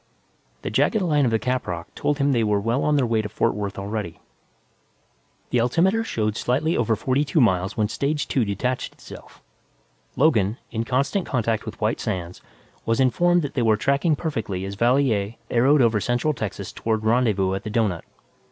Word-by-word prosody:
_ - - -38
The - - -3
jagged 220 - +2
line 150 -5 +2
of - - +2
the 110 - +3
caprock 110 -9 -3
told 145 - -1
him 140 0 +2
they 120 -4 +2
were 105 -1 +1
well 115 +6 0
on 150 - +2
their 140 -3 +2
way 115 -2 +1
to 105 - -6
Fort 115 +2 0
Worth 100 -1 -4
already. 100 -3 -4 1.3
The 125 - +2
altimeter 185 - +2
showed 110 - -2
slightly 145 +9 0
over 115 -2 +1
forty 130 +6 0
two 155 +2 0
miles 95 -6 +2
when 105 -1 +2
stage 145 +6 -2
two 130 - +1
detached 115 +5 -2
itself. - - -14 0.7
Logan, 115 -8 +2
in 115 -1 -2
constant 140 - 0
contact 115 -4 -1
with - - -7
White - - 0
Sands, 90 -1 -4 0.4
was 115 +2 0
informed 175 +7 +3
that 145 - -4
they 130 - 0
were 110 -2 +3
tracking 140 +7 +1
perfectly 110 - -3
as 100 - -5
Valier 115 -2 +1 0.2
arrowed 130 +4 +4
over 110 -3 +2
central 120 +7 0
Texas 100 -6 -5
toward 110 -1 -2
rendezvous 110 -5 +2
at 95 - -3
the - - -5
doughnut. 105 -6 0
115 Hz, 185 wpm, -23 LUFS, 105-140 Hz, 1.3 s, arrowed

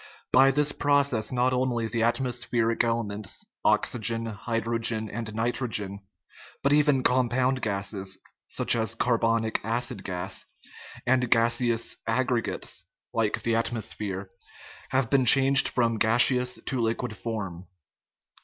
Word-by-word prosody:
By 135 +1 +6
this 145 +2 +2
process 140 -7 +1
not 125 0 +1
only 125 -2 0
the 115 0 -2
atmospheric 120 -1 0
elements, 110 -3 -2 0.2
oxygen, 115 0 +1
hydrogen, 115 0 -2
and 110 0 -5
nitro 120 +3 -1
gen, 100 -3 -2 0.6
but 140 - +3
even 145 -3 +3
compound 130 +1 +1
gases 100 -2 -3 0.3
(such - - +3
as 115 -1 -1
carbonic 115 -2 0
acid 115 -1 -2
gas) 90 -2 -4 0.6
and 125 -1 +2
gaseous 115 0 +1
aggregates 120 0 -1 0.3
(like 110 -2 -1
the 115 -1 +1
atmosphere) 105 -4 -2 0.6
have 130 -3 0
been 135 -2 +3
changed 135 +1 +7
from 115 -3 0
gaseous 125 +3 +3
to 130 - -2
liquid 115 0 -2
form. 95 -5 -6
115 Hz, 115 wpm, -26 LUFS, 110-125 Hz, 0.6 s, changed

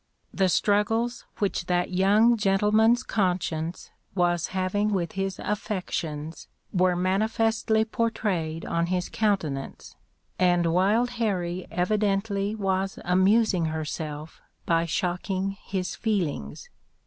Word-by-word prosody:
The 190 -1 +2
struggles 225 +5 +1
which 190 -3 -1
that 180 0 0
young 205 +6 +4
gentleman's 215 +3 +3
conscience 175 -6 -2 0.2
was 175 -2 +1
having 190 +3 0
with 180 -5 -1
his 195 -1 -3
affections 170 -7 -4 0.3
were 180 -1 +3
manifestly 220 +4 +1
portrayed 205 -9 -2
on 170 0 0
his 180 0 -1
countenance, 165 -11 -2 0.4
and 175 -2 +3
Wild 210 +7 +2
Harrie 180 -4 -1
evidently 200 +2 0
was 195 -2 -1
amusing 190 0 +3
herself 155 -1 -5 0.2
by 165 0 +2
shocking 185 +3 -1
his 185 -2 -3
feelings. 210 - -2
190 Hz, 100 wpm, -26 LUFS, 175-210 Hz, 0.4 s, young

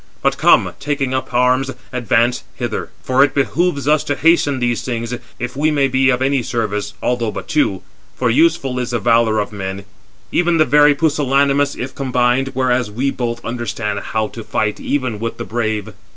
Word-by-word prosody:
But - - +1
come, - - +4
taking 140 -3 -2
up 130 0 -2
arms, 125 +2 +2 0.2
advance 120 0 +1
hither; - - -4
for 130 +2 +4
it 145 - 0
behoves 140 - 0
us 150 0 +3
to 145 - -1
hasten 155 -3 +3
these 120 -2 0
things, 115 -1 -4 0.2
if 120 +1 -5
we 150 +3 +2
may 145 -3 +2
be 130 0 +2
of 125 0 +1
any 135 0 +1
service, 105 -4 -3
although 120 -2 0
but 105 - -6
two; 120 -11 0 0.3
for 125 -2 +1
useful 135 -2 +2
is 125 - -3
the 120 -1 -1
valour 115 -1 +3
of 105 0 -1
men, 95 -1 -5 0.5
even 175 -1 +2
the 155 - +4
very 150 0 +5
pusillanimous, 140 -2 +2
if 130 +1 -5
combined, 130 0 +1
whereas 125 -3 +1
we 130 +6 -1
both 120 -2 -4
understand 115 -3 -3
how 110 -1 -2
to 115 - -9
fight 105 0 -1
even 130 -7 -2
with 115 +1 -4
the - - -5
brave." 110 -3 -2
125 Hz, 180 wpm, -18 LUFS, 115-140 Hz, 0.5 s, very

